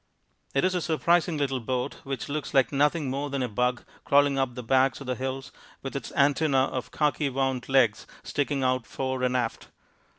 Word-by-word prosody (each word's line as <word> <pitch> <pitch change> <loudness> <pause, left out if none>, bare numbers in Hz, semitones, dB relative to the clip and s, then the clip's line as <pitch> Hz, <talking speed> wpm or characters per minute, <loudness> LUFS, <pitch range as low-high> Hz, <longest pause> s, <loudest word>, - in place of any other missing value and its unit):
It 135 - +3
is 185 - +2
a 180 - 0
surprising 170 +1 +2
little 135 -3 0
boat 125 +1 -3
which 135 -1 -4
looks 150 0 -4
like 135 -2 +4
nothing 150 +2 +2
more 140 +2 -2
than 140 -1 -1
a - - 0
bug 125 +2 -1 0.2
crawling 140 -1 +3
up 130 -2 -1
the 125 - -6
backs 130 +2 +2
of 140 - -8
the 125 - -1
hills 130 +1 -4 0.3
with 135 - -5
its 140 - -5
antenna 145 0 +3
of 130 -1 -3
khaki 150 -1 0
wound 130 -1 -1
legs 130 -6 +3 0.2
sticking 145 -1 -1
out 130 -2 0
fore 130 -1 -3
and 125 0 +1
aft. 120 -2 -3
135 Hz, 195 wpm, -27 LUFS, 130-145 Hz, 0.3 s, like